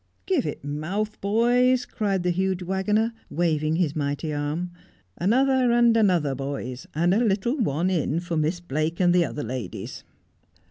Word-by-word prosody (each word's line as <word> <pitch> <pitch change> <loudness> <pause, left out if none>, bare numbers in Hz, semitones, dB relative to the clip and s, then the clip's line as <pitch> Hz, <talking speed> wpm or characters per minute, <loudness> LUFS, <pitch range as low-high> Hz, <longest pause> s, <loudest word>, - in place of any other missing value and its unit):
' - - -42
Give 370 -9 +1
it - - -5
mouth, 175 +9 -3
boys,' 245 +5 +3
cries 200 -4 -1
the 180 0 +1
huge 190 +1 -1
waggoner, 210 +5 0 0.2
waving 155 -2 0
his 165 -4 0
mighty 145 +1 -2
arm; 150 +5 -2 0.2
' 90 0 -38
another 255 +5 +3
and 235 -1 +4
another, 180 -10 +3
boys, 135 -2 -5
and 175 +3 +2
a 225 +5 +3
little 220 +5 +1
one 175 - +1
in 165 -2 0
for 175 -1 -4
Miss 160 +3 0
Blake 155 +1 -2
and 175 -2 +4
the 175 -1 +4
other 145 - -5
ladies.' 115 -4 -6
175 Hz, 170 wpm, -25 LUFS, 150-215 Hz, 0.2 s, and